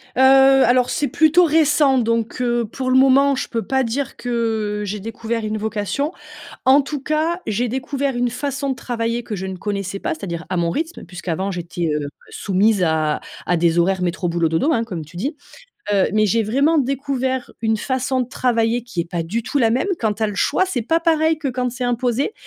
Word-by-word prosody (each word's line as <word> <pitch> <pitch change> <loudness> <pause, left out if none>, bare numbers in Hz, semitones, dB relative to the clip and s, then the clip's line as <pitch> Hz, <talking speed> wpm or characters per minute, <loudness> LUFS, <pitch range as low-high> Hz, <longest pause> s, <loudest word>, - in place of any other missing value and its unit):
Heu, 260 - +2
alors, 265 -2 +5
c'est 290 - 0
plutôt 320 +5 +4
récent, 300 -3 +3
donc, 230 -1 0
heu, 240 -1 +1
pour 255 -1 -2
le 260 - +5
moment, 270 +1 +5
je - - -3
peux 230 -2 -2
pas 265 -1 +1
dire 255 +3 -3
que, 245 - -7 0.5
heu, - - -3
j'ai 205 +1 -4
découvert 225 +1 -4
une 215 0 -2
vocation. 220 - -2 0.5
En 265 +2 +6
tout 285 +1 -4
cas, 315 +4 0
j'ai 230 +3 0
découvert 265 +1 -2
une 245 0 0
façon 275 +2 -3
de 265 - 0
travailler 235 -1 -3
que 215 -3 -5
je 190 - -5
ne 190 -1 -5
connaissais 195 0 -4
pas, - - -2
c'est-à-dire 170 0 -6
à 185 - -2
mon 170 -1 +1
rythme, 325 - -4
puisqu'avant 180 +2 -4
j'étais, 175 -2 -3
heu, 145 -1 -2 0.2
soumise 200 +1 +1
à 155 -2 +1 0.3
à 175 - +2
des 170 0 +2
horaires 185 +2 +2
métro, 175 0 -1
boulot, 170 -1 +1
dodo, 215 - +1
hein, 230 -4 +1
comme 175 -8 -6
tu 170 +4 -15
dis. 280 - -3 0.6
Heu, 195 - +3
mais 215 0 +3
j'ai 220 +2 +2
vraiment 280 +9 +2
découvert 265 -1 -1
une 220 -1 +1
façon 260 +2 -1
de 250 - -1
travailler 240 -2 0
qui 235 -8 -6
est 170 - -2
pas 170 -2 -2
du 215 +8 -2
tout 285 - -2
la 235 -5 +3
même. 255 - 0
Quand 215 -2 0
tu 220 - -2
as - - +2
le 205 - -5
choix, 295 - +2
c'est 275 -11 -2
pas 325 +9 +1
pareil 320 -1 +2
que 300 -3 -3
quand 250 -1 -2
c'est 250 +1 -3
imposé. 245 - 0
240 Hz, 215 wpm, -20 LUFS, 200-270 Hz, 0.6 s, En